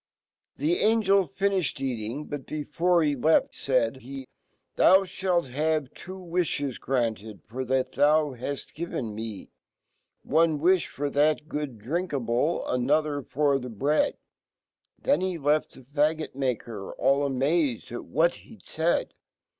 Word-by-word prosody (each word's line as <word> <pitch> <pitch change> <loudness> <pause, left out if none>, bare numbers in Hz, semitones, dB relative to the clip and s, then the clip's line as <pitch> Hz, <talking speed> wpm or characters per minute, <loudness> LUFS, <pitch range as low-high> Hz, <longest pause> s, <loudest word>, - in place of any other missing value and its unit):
The 155 +5 +1
AngeLtfnifhed 195 -5 +2
eating; 125 +1 -3
Sot 145 - -4
Jbefcrehe 155 -2 +1
left 160 +1 +4
,faid 130 -2 0
he, 135 +1 -8 0.5
"Thou, 190 +1 +6
fhalt 180 -5 -1
have 155 0 0
two 185 +2 -9
v/ifhe> 165 -6 -1
granted.'tor 115 - -3
fhat 130 0 0
fea 150 -3 +3
haft 140 -2 -5
given 140 -9 -4
me. 110 -2 -6 0.7
One 160 0 +3
wilhfof 160 -4 +1
that 150 +1 +2
gooddrinkabl 145 - -1
^another 145 +3 +1
f^r 140 +1 +1
the 125 - -6
bread." 140 +7 +1 0.8
Then 155 - +2
he 185 -2 -1
left 150 0 0 0.2
fhefaggot 155 +1 +1
maker 120 -6 -3
all 140 +1 +2
amazed 140 -1 0
atwhat 160 +8 +1
he'dfaid. 170 -6 -2
145 Hz, 110 wpm, -27 LUFS, 130-165 Hz, 0.8 s, Thou